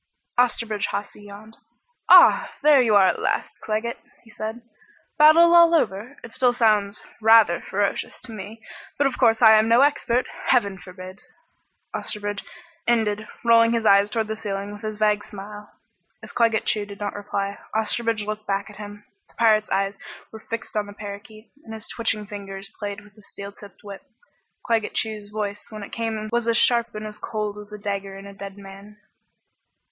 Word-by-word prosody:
Osterbridge 230 Hz, -4 st, +1 dB
Hawsey 205 Hz, 0 st, -5 dB
yawned. 210 Hz, +2 st, -13 dB, 0.5 s
"Ah -, -, +7 dB
there 295 Hz, -3 st, +6 dB
you 225 Hz, -4 st, +3 dB
are 195 Hz, -2 st, +6 dB
at 185 Hz, -, +1 dB
last, -, -, -2 dB
Claggett," 220 Hz, +2 st, -3 dB, 0.2 s
he 225 Hz, -, -18 dB
said, 220 Hz, +3 st, -6 dB, 0.6 s
"Battle 330 Hz, +3 st, +7 dB
all 340 Hz, -1 st, +7 dB
over? 240 Hz, -2 st, -1 dB
It 230 Hz, -, -11 dB
still 250 Hz, 0 st, +2 dB
sounds 210 Hz, -4 st, +2 dB, 0.2 s
rather 220 Hz, -5 st, +5 dB
ferocious, 200 Hz, +1 st, -2 dB
to 245 Hz, -, -9 dB
me. 220 Hz, +2 st, -9 dB, 0.3 s
But 285 Hz, -, +2 dB
of 275 Hz, -, -1 dB
course 225 Hz, +1 st, +3 dB
I 220 Hz, -1 st, +9 dB
am 220 Hz, -, +1 dB
no 230 Hz, +3 st, +5 dB
expert. 255 Hz, -3 st, +2 dB, 0.2 s
Heaven 200 Hz, -7 st, +2 dB
forbid!" 185 Hz, +2 st, -11 dB, 0.7 s
Osterbridge 205 Hz, -1 st, -3 dB, 0.4 s
ended, 220 Hz, -2 st, +1 dB, 0.2 s
rolling 230 Hz, 0 st, +5 dB
his 230 Hz, -1 st, -1 dB
eyes 200 Hz, 0 st, +5 dB
toward 220 Hz, +1 st, -1 dB
the 220 Hz, -, -3 dB
ceiling 205 Hz, -2 st, -5 dB
with 205 Hz, -, -11 dB
his 215 Hz, -1 st, -5 dB
vague 210 Hz, -1 st, +1 dB
smile. 210 Hz, +1 st, -10 dB, 0.5 s
As -, -, -8 dB
Claggett 230 Hz, -2 st, +1 dB
Chew 210 Hz, -1 st, -1 dB
did 200 Hz, -1 st, -11 dB
not 205 Hz, -1 st, -3 dB
reply, 200 Hz, -1 st, -4 dB, 0.2 s
Osterbridge 220 Hz, 0 st, 0 dB
looked 215 Hz, 0 st, -6 dB
back 200 Hz, +1 st, -2 dB
at 210 Hz, -, -15 dB
him. 205 Hz, 0 st, -10 dB, 0.2 s
The -, -, -28 dB
pirate's 215 Hz, -2 st, +3 dB
eyes 195 Hz, +1 st, -1 dB, 0.3 s
were 220 Hz, 0 st, -12 dB
fixed 230 Hz, 0 st, -5 dB
on 210 Hz, -1 st, -1 dB
the 205 Hz, -, -10 dB
parakeet, 205 Hz, +2 st, -10 dB
and 220 Hz, -1 st, -9 dB
his 220 Hz, 0 st, -8 dB
twitching 220 Hz, -2 st, -2 dB
fingers 195 Hz, -1 st, -8 dB
played 205 Hz, -1 st, -5 dB
with 205 Hz, 0 st, -19 dB
the 215 Hz, -, -19 dB
steel 200 Hz, 0 st, -9 dB
tipped 200 Hz, -1 st, -16 dB
whip. 200 Hz, -1 st, -9 dB, 0.6 s
Claggett 225 Hz, -3 st, 0 dB
Chew's 215 Hz, -2 st, -3 dB
voice 210 Hz, -1 st, -5 dB
when 215 Hz, -2 st, -8 dB
it -, -, -10 dB
came 225 Hz, -2 st, -3 dB
was 235 Hz, 0 st, 0 dB
as 230 Hz, 0 st, +3 dB
sharp 235 Hz, -2 st, +2 dB
and 215 Hz, 0 st, -5 dB
as 210 Hz, 0 st, -9 dB
cold 210 Hz, -2 st, -4 dB
as 210 Hz, 0 st, -12 dB
a 210 Hz, -, -7 dB
dagger 200 Hz, -1 st, -5 dB
in 195 Hz, -, -11 dB
a 200 Hz, -, -10 dB
dead 195 Hz, 0 st, -9 dB
man. 200 Hz, +1 st, -13 dB
215 Hz, 185 wpm, -23 LUFS, 200-225 Hz, 0.7 s, I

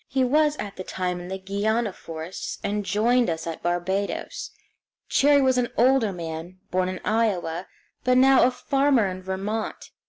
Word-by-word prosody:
He 265 Hz, -1 st, +1 dB
was 295 Hz, +3 st, +3 dB
at 200 Hz, -1 st, -6 dB
the 185 Hz, -, -5 dB
time 180 Hz, -1 st, -3 dB
in 175 Hz, -, -8 dB
the 190 Hz, +1 st, -4 dB
Guiana 205 Hz, +3 st, -1 dB
forests, 165 Hz, +1 st, -6 dB
and 205 Hz, +1 st, -1 dB
joined 230 Hz, +4 st, +2 dB
us 165 Hz, -1 st, -3 dB
at 165 Hz, -1 st, -5 dB
Barbados. 175 Hz, +3 st, -2 dB, 0.6 s
Cherrie 285 Hz, 0 st, +4 dB
was 260 Hz, -1 st, +3 dB
an 240 Hz, -, 0 dB
older 250 Hz, -3 st, +4 dB
man, 165 Hz, 0 st, -6 dB
born 185 Hz, 0 st, +1 dB
in 185 Hz, -, -5 dB
Iowa, 190 Hz, -6 st, 0 dB, 0.4 s
but 255 Hz, 0 st, +3 dB
now 265 Hz, +1 st, +6 dB
a 245 Hz, -, +5 dB
farmer 270 Hz, -2 st, +2 dB
in 185 Hz, -1 st, -4 dB
Vermont. 195 Hz, +4 st, -4 dB
205 Hz, 165 wpm, -25 LUFS, 185-250 Hz, 0.6 s, now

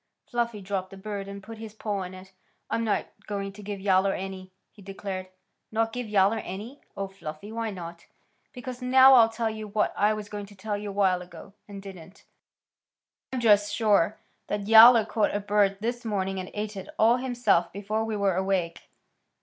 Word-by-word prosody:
Fluffy 235 Hz, -3 st, -1 dB
dropped 190 Hz, -1 st, -3 dB
the 195 Hz, -, -11 dB
bird 200 Hz, 0 st, -5 dB
and 200 Hz, 0 st, -8 dB
put 225 Hz, +2 st, -10 dB
his 220 Hz, -1 st, -9 dB
paw 210 Hz, -2 st, -3 dB
on 185 Hz, 0 st, -6 dB
it. 185 Hz, +1 st, -13 dB, 0.4 s
"I'm 230 Hz, -, 0 dB
not 215 Hz, -2 st, 0 dB, 0.2 s
going 200 Hz, -1 st, -4 dB
to 210 Hz, -, -11 dB
give 205 Hz, -1 st, -5 dB
Yowler 195 Hz, 0 st, +3 dB
any," 190 Hz, -1 st, -6 dB, 0.2 s
he 210 Hz, -, -18 dB
declared. 195 Hz, -1 st, -6 dB, 0.4 s
"Not 225 Hz, 0 st, 0 dB
give 245 Hz, -3 st, -4 dB
Yowler 205 Hz, +2 st, +3 dB
any! 220 Hz, +10 st, -8 dB, 0.2 s
Oh, 195 Hz, 0 st, -2 dB
Fluffy! 195 Hz, 0 st, -9 dB
Why 225 Hz, 0 st, -3 dB
not?" 170 Hz, -3 st, -9 dB, 0.4 s
"Because. 250 Hz, -1 st, -8 dB
Now 260 Hz, +1 st, +7 dB
I'll 230 Hz, -3 st, +7 dB
tell 225 Hz, 0 st, -2 dB
you 215 Hz, -1 st, -7 dB
what 210 Hz, +1 st, 0 dB
I 210 Hz, +1 st, +2 dB
was 210 Hz, -1 st, -6 dB
going 205 Hz, -1 st, -7 dB
to 205 Hz, -, -15 dB
tell 205 Hz, +2 st, -3 dB
you 205 Hz, 0 st, -5 dB
awhile 195 Hz, -2 st, +2 dB
ago, 180 Hz, +2 st, -12 dB
and 200 Hz, -1 st, -9 dB
didn't. 190 Hz, -1 st, -12 dB, 1.1 s
I'm 260 Hz, -2 st, -2 dB
just 205 Hz, -2 st, +4 dB
sure 210 Hz, -2 st, +2 dB, 0.3 s
Yowler 220 Hz, +2 st, +7 dB
caught 215 Hz, -3 st, 0 dB
a -, -, +1 dB
bird 205 Hz, -1 st, +2 dB
this 240 Hz, +2 st, -2 dB
morning 195 Hz, -3 st, -2 dB
and 185 Hz, -, -6 dB
ate 210 Hz, 0 st, -4 dB
it 190 Hz, -, -8 dB
all 230 Hz, +3 st, +5 dB
himself 240 Hz, -9 st, +1 dB
before 210 Hz, +2 st, -2 dB
we 225 Hz, -1 st, -3 dB
were 200 Hz, -2 st, +2 dB
awake." 185 Hz, -3 st, -2 dB
205 Hz, 190 wpm, -27 LUFS, 195-220 Hz, 1.1 s, Now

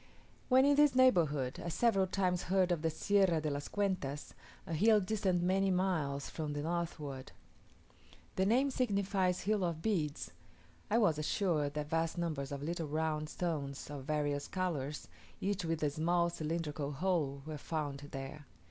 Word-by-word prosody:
When 260 Hz, +1 st, +6 dB
in 285 Hz, 0 st, +4 dB
this 295 Hz, -3 st, +5 dB
neighbourhood, 160 Hz, -, +3 dB
I 170 Hz, -, -3 dB
several 195 Hz, +1 st, +2 dB
times 185 Hz, -2 st, 0 dB
heard 185 Hz, -1 st, +3 dB
of 170 Hz, -3 st, 0 dB
the 165 Hz, -, +1 dB
Sierra 190 Hz, 0 st, +2 dB
de 155 Hz, -1 st, -2 dB
las 145 Hz, 0 st, -3 dB
Cuentas: 185 Hz, -9 st, -2 dB, 0.3 s
a 165 Hz, -, -5 dB
hill 215 Hz, +6 st, +5 dB
distant 185 Hz, -3 st, 0 dB
many 195 Hz, +2 st, +2 dB
miles 160 Hz, -7 st, 0 dB
to 155 Hz, -2 st, -4 dB
the 145 Hz, 0 st, -3 dB
northward. 155 Hz, -5 st, -4 dB, 1.0 s
The 190 Hz, +1 st, +2 dB
name 260 Hz, +6 st, +3 dB
signifies 200 Hz, -6 st, +1 dB
hill 210 Hz, -1 st, +1 dB
of 165 Hz, -2 st, -2 dB
beads. 160 Hz, -9 st, -1 dB, 0.6 s
I 215 Hz, -, +3 dB
was 170 Hz, -10 st, +3 dB
assured 155 Hz, -3 st, 0 dB
that 150 Hz, 0 st, -4 dB
vast 165 Hz, 0 st, 0 dB
numbers 155 Hz, -5 st, -2 dB
of 140 Hz, 0 st, -4 dB
little 165 Hz, 0 st, -2 dB
round 155 Hz, 0 st, -1 dB
stones, 145 Hz, -6 st, -3 dB
of 140 Hz, -2 st, -6 dB
various 145 Hz, -1 st, -1 dB
colours, 150 Hz, -6 st, -3 dB, 0.3 s
each 200 Hz, -2 st, -1 dB
with 165 Hz, -1 st, -1 dB
a 145 Hz, -, +2 dB
small 170 Hz, +3 st, +1 dB
cylindrical 155 Hz, -3 st, -3 dB
hole, 150 Hz, -4 st, -1 dB
are 155 Hz, -2 st, -5 dB
found 145 Hz, -3 st, -3 dB
there. 135 Hz, +1 st, -7 dB
165 Hz, 160 wpm, -34 LUFS, 150-190 Hz, 1.0 s, When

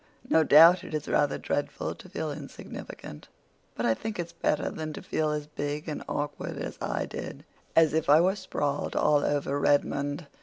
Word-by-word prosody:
No 160 Hz, -, +4 dB
doubt 165 Hz, +4 st, +7 dB
it -, -, -5 dB
is 150 Hz, -, -3 dB
rather 145 Hz, -1 st, +2 dB
dreadful 145 Hz, -, -2 dB
to -, -, -14 dB
feel -, -, -3 dB
insignificant; 75 Hz, -, -9 dB, 0.5 s
but -, -, -2 dB
I 115 Hz, -, +4 dB
think 220 Hz, -, -5 dB
it's 170 Hz, -1 st, -4 dB
better 155 Hz, -2 st, 0 dB
than 155 Hz, -1 st, -5 dB
to -, -, -7 dB
feel 155 Hz, -1 st, 0 dB
as 150 Hz, -1 st, -2 dB
big 150 Hz, +1 st, -4 dB
and 150 Hz, -, -4 dB
awkward 145 Hz, 0 st, -3 dB
as -, -, -5 dB
I -, -, -1 dB
did—as 160 Hz, -2 st, -1 dB
if 160 Hz, -2 st, 0 dB
I 150 Hz, +2 st, +8 dB
were 185 Hz, +3 st, +3 dB
sprawled 145 Hz, -7 st, -2 dB
all 150 Hz, -1 st, +3 dB
over 145 Hz, -1 st, 0 dB
Redmond. 145 Hz, +2 st, +1 dB
150 Hz, 180 wpm, -28 LUFS, 145-160 Hz, 0.5 s, I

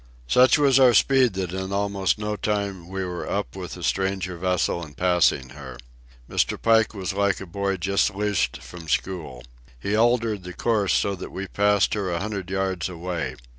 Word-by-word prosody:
Such 125 Hz, -, +5 dB
was 140 Hz, -3 st, +4 dB
our 125 Hz, -3 st, +6 dB
speed 130 Hz, -1 st, +4 dB
that 95 Hz, -2 st, -3 dB
in 95 Hz, 0 st, -4 dB
almost 100 Hz, -1 st, 0 dB
no 105 Hz, 0 st, -3 dB
time 100 Hz, -4 st, -2 dB
we 95 Hz, 0 st, -4 dB
were 90 Hz, -1 st, -5 dB
up -, -, -3 dB
with -, -, -6 dB
the -, -, -9 dB
stranger 95 Hz, -1 st, -1 dB
vessel 90 Hz, -1 st, 0 dB
and 75 Hz, -4 st, -11 dB
passing 90 Hz, -7 st, +2 dB
her. 70 Hz, 0 st, -10 dB, 0.5 s
Mr. -, -, 0 dB
Pike 115 Hz, -1 st, +3 dB
was 95 Hz, -1 st, -3 dB
like 100 Hz, 0 st, +1 dB
a 95 Hz, -, -7 dB
boy 100 Hz, +2 st, -2 dB
just 100 Hz, +3 st, +1 dB
loosed 105 Hz, 0 st, -1 dB
from 85 Hz, -2 st, -10 dB
school. 75 Hz, -6 st, -3 dB, 0.4 s
He 100 Hz, +11 st, -1 dB
altered 110 Hz, -4 st, +1 dB
our 90 Hz, -, -6 dB
course 105 Hz, -2 st, +1 dB
so 100 Hz, -, +1 dB
that 95 Hz, -, -7 dB
we 95 Hz, -, -5 dB
passed 100 Hz, 0 st, +2 dB
her 100 Hz, -3 st, -1 dB
a 85 Hz, -1 st, -1 dB
hundred 100 Hz, -3 st, -4 dB
yards 95 Hz, -2 st, -1 dB
away. 85 Hz, -2 st, -4 dB
95 Hz, 185 wpm, -24 LUFS, 90-105 Hz, 0.5 s, our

